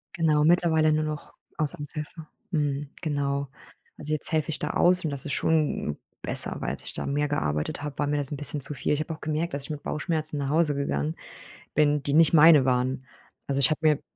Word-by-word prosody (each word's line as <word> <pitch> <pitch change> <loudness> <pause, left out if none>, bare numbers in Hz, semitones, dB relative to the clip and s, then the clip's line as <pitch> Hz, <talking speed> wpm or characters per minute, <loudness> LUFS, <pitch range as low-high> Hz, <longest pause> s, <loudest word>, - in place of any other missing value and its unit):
Genau, 155 -3 +2
mittlerweile 160 -1 +3
nur 155 0 +1
noch 155 -1 -6 0.2
als 155 -2 0
Aushilfe. 150 +2 -8 0.3
Mhm, 145 -3 -1
genau. 140 -3 -1 0.5
Also, 150 +1 -3
jetzt 155 - 0
helfe 155 0 0
ich 160 - -3
da 150 - -2
aus 180 0 +3
und 155 - -2
das 140 -2 -5
ist 145 - -3
schon 155 - 0 0.2
besser, - - +5
weil - - -2
als - - -6
ich - - -8
da - - -5
mehr 145 +1 0
gearbeitet 75 - -2
habe, 150 -1 -6
war 145 - +1
mir 145 0 0
das 145 0 +1
'n 145 - -3
bisschen 145 0 -3
zu 150 - -1
viel. 145 - -1
Ich 150 - -1
habe 155 +1 -3
auch 155 - -12
gemerkt, 155 +2 -2
dass 140 - -4
ich - - -8
mit 150 -2 -6
Bauchschmerzen 155 -1 -1
nach 140 -1 -2
Hause 155 -1 +2
gegangen 75 - -2 0.6
bin, 150 -1 +3
die 140 - -1
nicht 165 +2 +5
meine 155 -3 +7
waren. 130 +1 0 0.4
Also 140 0 -1
ich 130 - +4
habe 155 - -1
mir 155 -1 +4
d - - -24
150 Hz, 230 wpm, -26 LUFS, 140-155 Hz, 0.6 s, meine